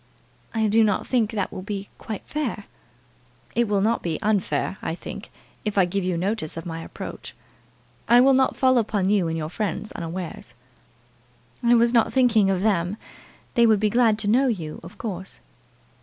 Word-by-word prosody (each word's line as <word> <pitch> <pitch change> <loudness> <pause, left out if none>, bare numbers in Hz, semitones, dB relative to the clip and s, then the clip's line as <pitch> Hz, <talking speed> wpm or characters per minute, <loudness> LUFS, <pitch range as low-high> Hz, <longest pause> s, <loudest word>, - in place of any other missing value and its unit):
"I 220 -1 +2
do 220 +2 +4
not 205 -3 +1
think 235 -5 +1
that 205 -4 -2
will - - -6
be 200 0 -5
quite 215 -3 -6
fair." 280 -9 -3 0.9
"It 235 0 +2
will 205 -1 +1
not 225 +3 +1
be 165 -3 -2
unfair, 205 -2 0
I 160 - -3
think, - - -8 0.3
if 210 -1 -3
I 190 - +6
give 195 +2 -2
you 180 -1 -1
notice 185 -3 -2
of 165 - -6
my 165 -1 -5
approach. - - -8 0.7
I 240 +1 +7
will 270 +2 +6
not 265 0 +3
fall 260 -2 +4
upon 205 -3 0
you 195 -5 +2
and 165 0 -2
your 155 -1 -3
friends 210 +2 -3
unawares." 170 +1 -6 1.1
"I 240 0 +4
was 235 +1 +3
not 230 -2 +3
thinking 235 -6 +4
of 190 -1 +1
them. 195 -2 +1 0.6
They 235 -1 +5
would 215 -2 +4
be 210 0 +1
glad 230 -2 +3
to 210 - -3
know 255 +6 +4
you, 170 -10 -3
of 170 +2 -12
course." 190 -4 -6
210 Hz, 185 wpm, -24 LUFS, 185-230 Hz, 1.1 s, I